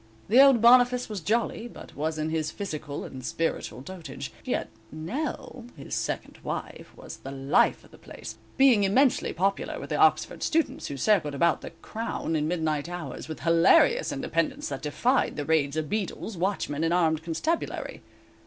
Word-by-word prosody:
The 245 +5 +7
old 270 -5 +6
Boniface 245 0 +6
was 210 -4 -4
jolly, 230 +5 -1
but - - -12
was 155 +2 -2
in 155 +1 -2
his 155 -1 -1
physical 155 -7 -5
and 130 -1 -8
spiritual 165 -2 -2
dotage, 175 +3 -8
yet - - -2 0.2
"Nell," 245 - -5
his 140 - -8
second - - -3
wife, - - -6
was - - -9
the 135 - -9
life 135 +1 +2
of - - -19
the - - -16
place, - - -10 0.2
being 255 -6 +6
immensely 250 +7 +3
popular 195 +3 -1
with - - -8
the - - 0
Oxford - - +3
students, 325 0 0
who 140 - -5
circled 155 -4 +2
about 170 +3 +2
the - - -7
"Crown" 225 -7 -3
in 150 0 0
midnight 160 -2 -1
hours, 165 -7 -6
with 160 -3 -7
hilarious 185 - +4
independence, 290 +1 -2
that - - -5
defied 240 - +1
the 145 - -3
raids 155 -2 +1
of 155 -1 -1
beadles, 210 +3 -3
watchmen 170 -5 -1
and 165 +1 +2
armed 160 -3 +2
constabulary. 175 - -3
170 Hz, 170 wpm, -27 LUFS, 155-235 Hz, 0.2 s, The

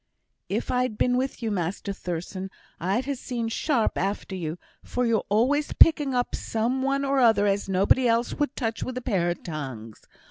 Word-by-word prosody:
"If - - -2
I'd 250 -3 0
been 245 0 +2
with 255 -1 -2
you, 225 - 0
Master 195 +1 -2
Thurstan, 185 +1 -5 0.3
I'd 195 +9 0
ha' 280 - -1
seen 240 -3 -3
sharp 235 0 0
after 195 0 -2
you, 165 -2 -4 0.2
for 250 0 -2
you're 230 -3 +1
always 260 +8 +2
picking 295 -5 +5
up 245 0 0
some 235 +4 -1
one 275 +1 0
or 275 0 +2
another 225 -4 +5
as 200 0 0
nobody 200 +7 +3
else 230 +1 +1
would 290 -3 -1
touch 225 -3 -2
with 255 -1 -4
a - - -3
pair 185 -8 +1
of 175 - -4
tongs. 130 -9 -6
225 Hz, 185 wpm, -26 LUFS, 190-255 Hz, 0.3 s, picking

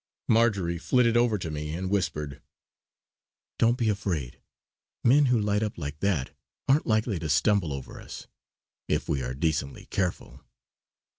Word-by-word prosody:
Marjory 100 -7 +2
flitted 120 +4 +3
over 120 -2 +3
to 85 -4 -5
me 75 +1 -4
and 95 +2 -3
whispered: 75 -8 -2 1.2
"Don't 115 +2 +4
be 120 -3 0
afraid. 95 - -2 0.6
Men 140 +5 +5
who 125 -2 +3
light 105 0 +1
up 105 -1 -2
like 70 -2 -5
that 85 -9 -1 0.3
aren't 140 +3 +3
likely 110 -3 +1
to 80 - -4
stumble 85 +2 +2
over 70 -2 -7
us, - - -9 0.6
if - - 0
we 70 - 0
are 65 0 -4
decently 75 -2 -2
careful." 90 -2 -3
95 Hz, 145 wpm, -27 LUFS, 75-110 Hz, 1.2 s, Men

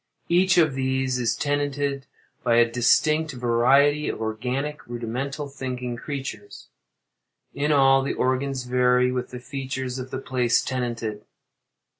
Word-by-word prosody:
Each 180 +1 +4
of 155 -4 +4
these 130 -1 -1
is 120 -3 +1
tenanted 145 -1 -1 0.4
by 115 - +3
a 120 0 +6
distinct 150 +6 +2
variety 130 +5 +3
of - - -4
organic, 125 +7 -3
rudimental, 125 +5 -4
thinking 125 -3 -5
creatures. 120 -5 -7 0.8
In 150 +2 0
all, 135 -2 +5
the 135 - -2
organs 130 0 0
vary 125 0 +2
with 125 -1 -3
the 125 - -7
features 130 -1 -5
of 130 0 -6
the - - -4
place 125 -2 +1
tenanted. 115 -5 -3
130 Hz, 130 wpm, -24 LUFS, 125-140 Hz, 0.8 s, a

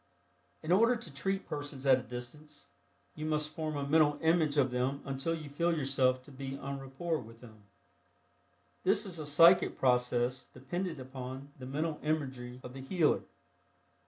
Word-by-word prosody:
In 155 - -2
order 230 +6 +5
to 200 -11 -5
treat 195 +7 -2
persons 145 -2 -5
at 130 -1 +6
a - - -6
distance, 125 +6 -8 0.5
you 155 - -7
must 150 -1 0
form 155 -3 -3
a 140 - -2
mental 150 -1 +4
image 160 -2 +3
of 135 -3 +3
them 130 +3 -1
until 135 +5 -1
you 160 - -7
can 145 - -9
feel 170 +3 +1
yourself 130 -2 +2
to 145 - -14
be 135 0 -6
en 140 0 -5
rapport 145 +5 -3
with 115 +1 -13
them. 110 -4 -15 1.2
This 200 +3 +3
is 180 -4 -3
a 150 - -4
psychic 165 +5 +6
process 125 0 +1
dependent 160 +5 -4
upon 130 +1 -7
the 130 - -7
mental 150 +3 -2
imagery 130 -5 -3
of 125 - -8
the 135 - -8
healer. 155 +3 +2
140 Hz, 170 wpm, -32 LUFS, 130-160 Hz, 1.2 s, at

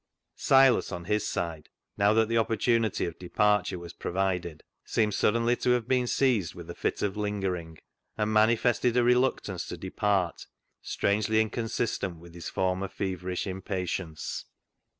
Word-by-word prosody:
Silas, 135 -3 +4
on 85 -2 -5
his 105 +2 0
side, 80 -3 -4 0.3
now 100 +1 +3
that 110 0 +3
the 115 - -1
opportunity 115 -2 +1
of 85 -1 -6
departure 100 +1 +1
was 85 -1 -9
provided, 90 -4 -2 0.2
seemed 105 -2 0
suddenly 115 +4 +2
to 125 - -1
I - - +6
have 120 -2 -1
been 125 -1 +2
seized 115 -10 +1
with 85 -2 -9
a - - -6
fit - - -2
of 100 -1 -1
lingering, 95 -6 -3 0.4
and 105 0 0
manifested 115 +2 +3
a 120 - +4
reluctance 125 +2 +1
to - - -6
depart 100 -4 -1 0.3
strangely 110 +2 +1
inconsistent 110 -4 -1
with 85 +1 -14
his 85 -1 -6
former 95 +1 -1
feverish 95 -2 -3
impa 95 0 -3
tience. 85 -3 -4
105 Hz, 150 wpm, -28 LUFS, 90-115 Hz, 0.4 s, I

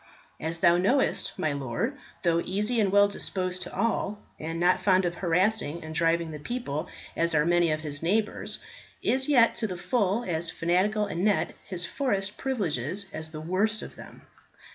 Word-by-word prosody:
As 165 +1 -2
thou 170 0 +6
knowest, 240 +10 +1
my 155 -6 0
lord 140 - -2 0.3
though 170 -1 +3
easy 210 +5 0
and 200 -3 +2
well 205 0 +6
disposed 185 -2 -3
to - - -5
all, 210 -2 0 0.2
and 165 +2 -4
not 180 +1 +3
fond 190 -2 +4
of 175 - 0
harassing 175 -2 +1
and 160 0 -7
driving 165 0 +1
the 150 - -7
people 155 - -4 0.3
as 170 -1 +1
are 150 0 +4
many 175 -1 +3
of 155 0 -1
his 145 -2 -3
neighbours, 210 +6 0 0.5
is 265 +2 +1
yet 245 -5 +6
to 220 - -1
the 180 -3 -5
full 200 +4 +1
as 170 -3 -1
fanatical 190 +6 +1
anent 200 +2 +1
his 180 -2 -4
forest 205 -3 -1
privileges 195 - -2
as 155 0 -5
the 155 -1 -7
worst 200 +7 0
of - - -9
them. - - -13
180 Hz, 175 wpm, -27 LUFS, 165-210 Hz, 0.5 s, thou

